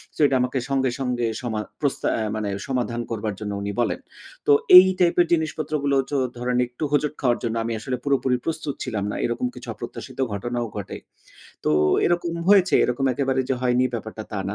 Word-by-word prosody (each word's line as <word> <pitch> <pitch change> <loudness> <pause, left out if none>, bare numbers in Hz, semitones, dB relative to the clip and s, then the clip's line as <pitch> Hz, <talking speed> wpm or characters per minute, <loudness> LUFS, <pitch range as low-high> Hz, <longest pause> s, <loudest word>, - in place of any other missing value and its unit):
So - - -16
এটা 135 -1 +2
আমাকে 125 +1 0
সঙ্গে, 135 -1 +1
সঙ্গে 125 -2 -1 0.2
সমা 110 -3 -3 0.2
প্রস্তা 140 -2 0
আ - - -1
মানে 105 -2 -2 0.2
সমাধান 120 -2 -1
করবার 110 -2 -2
জন্য 105 -1 -4
উনি 100 0 -3
বলেন। 115 - -1 0.5
তো - - +6 0.3
এই 185 - +11
টাইপের 175 0 +4
জিনিসপত্র 155 -1 -1
গুলো 140 -1 +2
চো 145 - 0 0.2
ধরেন 125 0 -1
একটু 125 +5 -8
হোঁচট 150 0 +1
খাওয়ার 120 -3 +2
জন্য 115 -1 -1
আমি 115 0 -2
আসলে 125 +3 -3
পুরোপুরি 135 -3 +1
প্রস্তুত 155 -3 -2
ছিলাম 110 -6 -3
না - - -4
এরকম 120 +1 -1
কিছু - - -10
অপ্রত্যাশিত - - -9 0.2
ঘটনাও 120 +3 -3
ঘটে। 100 - -5 0.7
তো - - +2 0.4
এরকম 175 -1 0 0.2
হয়েছে 195 -2 +5
এরকম 130 +3 -1
একেবারে 135 -1 0
যে 135 - +2
হয়নি 125 0 +2
ব্যাপারটা 110 -1 -5
তা 100 - -2
না। 100 - -3
125 Hz, 190 wpm, -23 LUFS, 115-145 Hz, 0.7 s, এই